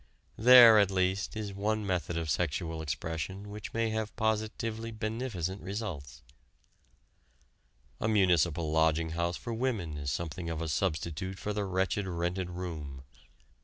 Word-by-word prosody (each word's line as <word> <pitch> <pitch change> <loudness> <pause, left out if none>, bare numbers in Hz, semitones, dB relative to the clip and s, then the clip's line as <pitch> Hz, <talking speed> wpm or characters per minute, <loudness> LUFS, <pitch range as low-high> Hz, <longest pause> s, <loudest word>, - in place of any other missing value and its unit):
There, 120 -1 +9
at 100 -2 +4
least, 95 +2 0
is 105 -2 -4
one 105 +2 -1
method 85 -3 -1
of 85 -1 -2
sexual 80 +1 -1
expression 80 +6 -4
which 105 0 -7
may 115 -1 0
have 110 0 -3
positively 110 +1 -1
beneficent 110 -4 -3
results. 85 - -6 1.8
A - - 0
municipal 85 -6 +2
lodging 80 +1 +2
house 85 +1 -1
for 120 - -5
women 110 - -2
is 70 -1 -3
something 85 +3 -4
of 80 -1 -3
a 85 -1 -3
substitute 85 +2 -2
for 105 +2 -3
the 105 -1 -1
wretched 95 +1 -1
rented 90 +1 -2
room. 80 -7 -6
95 Hz, 135 wpm, -30 LUFS, 80-110 Hz, 1.8 s, There